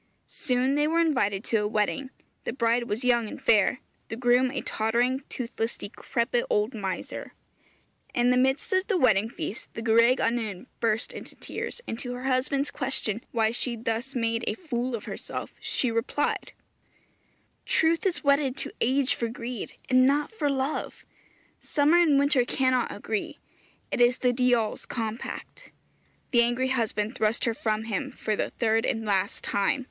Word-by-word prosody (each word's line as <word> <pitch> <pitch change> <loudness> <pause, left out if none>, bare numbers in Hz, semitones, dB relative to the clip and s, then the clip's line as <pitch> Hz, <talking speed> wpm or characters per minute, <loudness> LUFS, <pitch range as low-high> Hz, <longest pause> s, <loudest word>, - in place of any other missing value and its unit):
Soon 255 -1 0
they 295 +1 +2
were 330 +2 +2
invited 235 -12 +1
to 230 - +1
a 210 - 0
wedding; 215 +5 -1 0.3
the - - -2
bride 235 -1 +1
was 225 +5 -2
young 240 -2 +3
and - - -8
fair, 225 +3 +3 0.3
the - - -4
groom 245 +2 +3
a 270 - -3
tottering, 240 +4 0
toothless, 230 -2 -3
decrepit 235 +3 -1
old 210 +4 +1
miser. 195 -4 -5 0.8
In 245 0 +4
the - - +4
midst 265 +7 +1
of 375 +1 +2
the 405 -4 +2
wedding 220 - +3
feast 230 - -6
the 230 - -4
gwraig 230 +3 +5
annwn 230 -5 -1
burst 225 0 0
into - - -9
tears, - - -6
and 225 - -4
to 245 -1 -4
her 250 - -7
husband's 270 +2 0
question 250 -5 -2
why 225 -1 +2
she 240 0 -1
thus 230 +4 -3
made 230 -1 0
a - - 0
fool 255 -8 -2
of 215 - -6
herself - - -6
she 250 - -1
replied, 230 +5 -1 1.1
'Truth 325 +1 +3
is 380 -4 0
wedded 280 -2 +2
to - - -3
age 265 +2 +3
for 235 - -2
greed, 235 0 -6
and 255 0 +5
not 290 +2 +1
for 310 -10 -1
love 275 +2 -2 0.5
summer 300 +4 +3
and 310 -5 +5
winter 280 -2 +4
cannot 255 -1 +1
agree 210 0 -4 0.5
it - - 0
is 245 +1 +5
the 250 -1 +2
diawl's 245 -3 +1
compact.' 230 - -5 0.6
The 240 -2 +6
angry 240 +2 +1
husband 225 -3 0
thrust 220 -2 0
her 230 - +1
from 220 -1 -1
him 265 +5 -3
for 215 -3 -2
the - - -1
third 225 -1 +1
and 225 0 -1
last 200 0 0
time. 200 +7 +1
245 Hz, 165 wpm, -27 LUFS, 225-265 Hz, 1.1 s, The